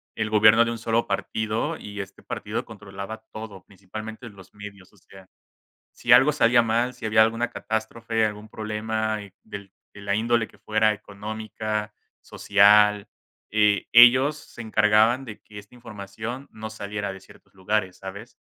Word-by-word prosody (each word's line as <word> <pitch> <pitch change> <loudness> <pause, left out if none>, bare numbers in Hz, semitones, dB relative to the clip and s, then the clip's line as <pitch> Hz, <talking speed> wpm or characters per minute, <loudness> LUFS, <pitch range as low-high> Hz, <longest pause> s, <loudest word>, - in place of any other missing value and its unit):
el 110 -1 -2
gobierno 110 +2 +6
de 115 - -2
un 115 - -4
solo 115 +1 -1
partido 110 +9 -2
y 105 0 -9
este 100 0 -12
partido 110 +4 -4
controlaba 105 0 -9
todo, 105 -3 -9
principalmente 110 +5 -9
los 100 -3 -16
medios, 100 -2 -12
o - - -24
sea, 95 0 -17 0.6
si - - -3
algo 145 +3 +6
salía 120 -4 +4
mal, 115 +3 0
si 125 - -9
había 110 0 +4
alguna 115 +2 -1
catástrofe, 110 0 -2
algún 105 0 -5
problema 110 0 -3 0.3
del 100 -3 -10 0.2
de 100 - -12
la 100 0 -1
índole 115 +1 +1
que - - -22
fuera 110 0 +2
económica, 105 +1 -5 0.3
social, 105 0 +4 0.4
eh, 105 -1 +2
ellos 130 +5 +7
se 145 - -12
encargaban 110 +4 +3
de 105 -4 -10
que 105 -1 -12
esta 105 +4 -17
información 115 +3 -8
no 110 0 -8
saliera 105 -1 -5
de 95 - -11
ciertos 95 - -20
lugares, 95 -1 -2
¿sabes? 100 +5 -10
110 Hz, 155 wpm, -24 LUFS, 105-115 Hz, 0.6 s, ellos